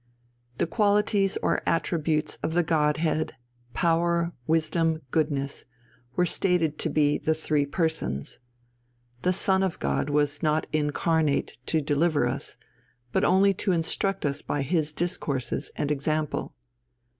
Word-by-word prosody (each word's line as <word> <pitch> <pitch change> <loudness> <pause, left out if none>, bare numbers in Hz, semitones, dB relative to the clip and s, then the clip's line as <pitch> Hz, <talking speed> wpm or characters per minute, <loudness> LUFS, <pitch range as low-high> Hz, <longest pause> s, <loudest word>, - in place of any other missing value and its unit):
The - - +1
qualities 205 +1 +2
or - - +1
attributes 160 -2 0
of 160 - -2
the 175 - +4
Godhead, 155 0 +1 0.4
power, 170 0 +2 0.2
wisdom, 160 0 +1
goodness, 145 -3 -1 0.5
were 180 - +3
stated 170 -4 +1
to - - -1
be 145 -1 +2
the 160 - +1
three 150 -2 0
Persons. 160 - -1 0.8
The 180 - +2
Son 190 +1 +2
of 190 -3 -1
God - - -1
was 145 0 +1
not 155 -1 +1
incarnate 155 -2 0
to 160 - +2
deliver 145 -1 +2
us, 135 +4 -2 0.5
but - - +1
only 195 +1 +4
to 190 0 0
instruct 180 +3 0
us 145 0 0
by 145 - -2
His 155 +1 0
discourses 150 -6 -2
and 145 - -1
example. 150 +1 -2
160 Hz, 130 wpm, -26 LUFS, 150-175 Hz, 0.8 s, the